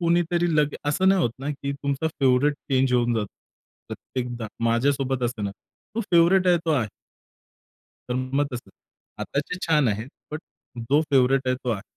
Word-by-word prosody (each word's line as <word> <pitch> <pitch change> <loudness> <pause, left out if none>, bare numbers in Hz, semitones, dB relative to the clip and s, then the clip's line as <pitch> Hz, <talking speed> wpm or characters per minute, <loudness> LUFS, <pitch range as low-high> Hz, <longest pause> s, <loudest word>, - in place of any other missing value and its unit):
कुणीतरी 170 0 +2
लग 150 -1 +2
असं 190 +6 +3
नाही 195 -1 +4
होत 115 - +2
ना 140 - -4
की 140 -1 -4
तुमचा 140 +2 -2
फेव्हरेट 135 +2 +4
चेंज 135 -2 0
होऊन 120 -1 +2
जातो 105 -2 0 0.6
प्रत्येकदा? 120 -3 -5 0.2
माझ्यासोबत 130 +2 +1
असं 120 -3 -2
नाही 100 - -3 0.4
होत, 230 - 0
तो - - -24
फेव्हरेट 180 +2 +5
आहे 175 -1 +5
तो - - +2
आहे. 130 -8 +1 1.2
तर 125 - -1
मग 130 +3 0
तसं. 120 - -7 0.5
आताचे 145 +5 -3
छान 150 -5 +3
आहेत 110 +4 -2 0.2
बट 155 - -3 0.5
जो 145 - +5
फेवरेट 135 0 +3
आहे 125 - +3
तो 125 -1 -3
आहे. 100 -3 -2
135 Hz, 170 wpm, -24 LUFS, 125-155 Hz, 1.2 s, फेव्हरेट